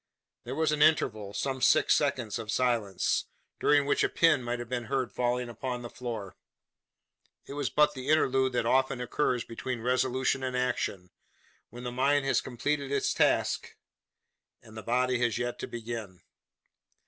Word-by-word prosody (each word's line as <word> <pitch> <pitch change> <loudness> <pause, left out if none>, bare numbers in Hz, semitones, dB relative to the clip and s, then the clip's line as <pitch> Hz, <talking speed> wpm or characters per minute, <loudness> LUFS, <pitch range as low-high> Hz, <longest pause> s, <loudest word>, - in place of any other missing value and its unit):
There 125 +3 -4
was 160 0 +1
an 150 -1 -1
interval 110 -10 +3
some 130 +5 -3
six - - +5
seconds 125 -7 0
of 110 -2 -7
silence, 115 -6 0 0.3
during 145 -1 +4
which 140 - +2
a - - +2
pin 160 -5 +3
might 120 0 -2
have 120 -1 -6
been 120 -1 -3
heard 130 +2 -1
falling 125 0 -1
upon 125 +1 -5
the 120 - -7
floor. 115 -6 -6 1.1
It - - -8
was 145 -2 -2
but 150 0 +3
the 130 0 -6
interlude 135 -4 +3
that 120 - 0
often 130 +1 +2
occurs 125 -1 0
between 125 +1 -5
resolution 130 +2 +1
and 130 -1 -2
action; 100 -8 -2 0.6
when 120 +2 -10
the 125 - -4
mind 135 +3 +2
has 135 - +2
completed 140 +3 -2
its 140 -1 +1
task, - - +1 0.9
and 110 -1 -15
the 110 - -6
body 125 +2 +1
has 120 -2 +1
yet 120 0 -3
to - - -4
begin. 115 -5 -6
125 Hz, 165 wpm, -29 LUFS, 120-135 Hz, 1.1 s, six